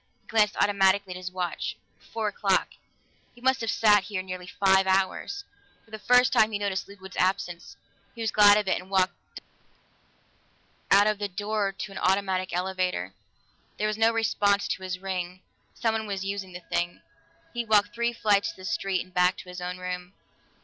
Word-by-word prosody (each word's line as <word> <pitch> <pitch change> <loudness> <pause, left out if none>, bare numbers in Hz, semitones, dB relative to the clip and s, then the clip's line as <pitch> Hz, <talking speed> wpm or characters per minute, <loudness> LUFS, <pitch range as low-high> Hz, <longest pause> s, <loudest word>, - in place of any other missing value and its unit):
He - - -37
glanced 210 -2 +2
automatically 200 -1 +2
at - - -8
his 185 0 -5
watch: 180 -1 -4 0.2
four 225 -1 -4
o'clock 195 -2 +1 0.7
he - - -16
must 260 0 +1
have 225 - -2
sat 210 -3 +4
here 190 -3 -3
nearly 185 -1 -7
five 190 0 +3
hours. 195 - 0 0.4
For 225 - -25
the 220 - -7
first 250 +3 +4
time 220 -3 +4
he 210 - -1
noticed 200 -2 -3
Ludwig's 190 -1 -12
absence; 180 -2 -1 0.4
he 230 - -8
was 220 -2 0
glad 205 0 +7
of 210 -2 -1
it 185 - +1
and 185 - -16
walked 190 -1 +2 0.2
dully - - -11 1.5
out - - +3
of 215 -1 +1
the 205 - -1
door 205 +1 -2
to 195 +1 -7
an 195 - -6
automatic 190 -1 +1
elevator. 180 - -2 0.6
There 215 - -1
was 215 - -1
no 225 +1 +5
response 205 -3 +1
to - - -2
his 185 -1 -4
ring; 185 -1 -4 0.3
someone 220 -2 -1
was 195 -1 -3
using 195 -2 -4
the 180 - -8
thing. 175 +1 -2 0.5
He 240 -1 -2
walked 210 -2 +3
three 235 0 0
flights 210 -3 +2
to - - -9
the 185 - -11
street 190 -1 -1
and 185 - -23
back 180 +1 +3
to 180 - -10
his 180 0 -8
own 180 0 -4
room. 180 0 -6
195 Hz, 190 wpm, -27 LUFS, 185-210 Hz, 1.5 s, glad